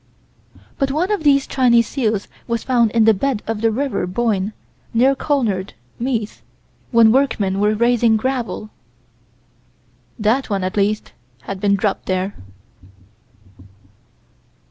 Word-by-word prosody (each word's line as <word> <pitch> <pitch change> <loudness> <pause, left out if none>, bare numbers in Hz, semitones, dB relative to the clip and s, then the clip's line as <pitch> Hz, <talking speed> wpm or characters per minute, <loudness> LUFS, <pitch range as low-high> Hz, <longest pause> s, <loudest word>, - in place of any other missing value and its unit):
But 275 - +1
one 330 +8 -1
of 415 - 0
these 280 -2 +4
Chinese 240 -3 +3
seals 220 -7 -1 0.2
was 235 -2 -2
found 240 -3 +2
in 225 0 +2
the 220 - +6
bed 245 +1 -2
of 220 -1 -3
the 225 - +3
River 255 -4 -2
Boyne, 205 0 -1 0.4
near 260 +4 +4
Clonard, 230 -10 -1 0.2
Meath, 230 -4 -3 0.5
when 230 -2 +5
workmen 215 -7 +1
were 210 +1 +2
raising 235 0 +3
gravel. 235 -3 -3 1.5
That 225 +6 0
one, 195 -2 -1
at 185 - -3
least, 210 +1 -1 0.3
had 195 -1 -6
been 200 0 +2
dropped 200 0 -2
there. 185 +1 -1
225 Hz, 125 wpm, -19 LUFS, 205-260 Hz, 1.5 s, the